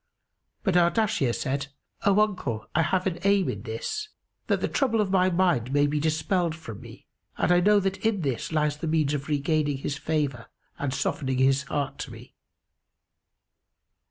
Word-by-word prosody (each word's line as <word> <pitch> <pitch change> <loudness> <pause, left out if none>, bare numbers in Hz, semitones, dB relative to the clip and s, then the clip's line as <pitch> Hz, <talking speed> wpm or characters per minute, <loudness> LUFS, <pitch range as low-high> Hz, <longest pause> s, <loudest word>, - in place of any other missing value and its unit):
But 190 -3 +1
Ardashir 175 - +3
said, 140 +3 -2 0.4
"O 200 +1 +5
uncle, 140 - -1
I 165 - +3
have 185 +3 +1
an 180 -3 -1
aim 200 -2 +3
in 100 - -4
this, 125 - -4 0.4
that - - +2
the - - 0
trouble 240 -5 +1
of 205 -3 +1
my 185 -1 +4
mind 170 -9 +1
may 145 +1 +3
be 150 +1 0
dispelled 160 +2 0
from 115 -9 -9
me 115 -1 -13 0.3
and - - +2
I 175 - +6
know 205 +3 +5
that 195 -1 -2
in 220 -4 +1
this 135 -4 -2
lies 150 -2 +1
the 165 - -4
means 155 -2 +1
of 140 -1 -3
regaining 150 -1 0
his 140 +1 -3
favour 145 -6 -1 0.3
and 140 -2 -1
softening 135 0 -1
his 135 +1 +3
heart 140 0 -3
to - - -5
me." - - -12
155 Hz, 175 wpm, -26 LUFS, 140-185 Hz, 0.4 s, I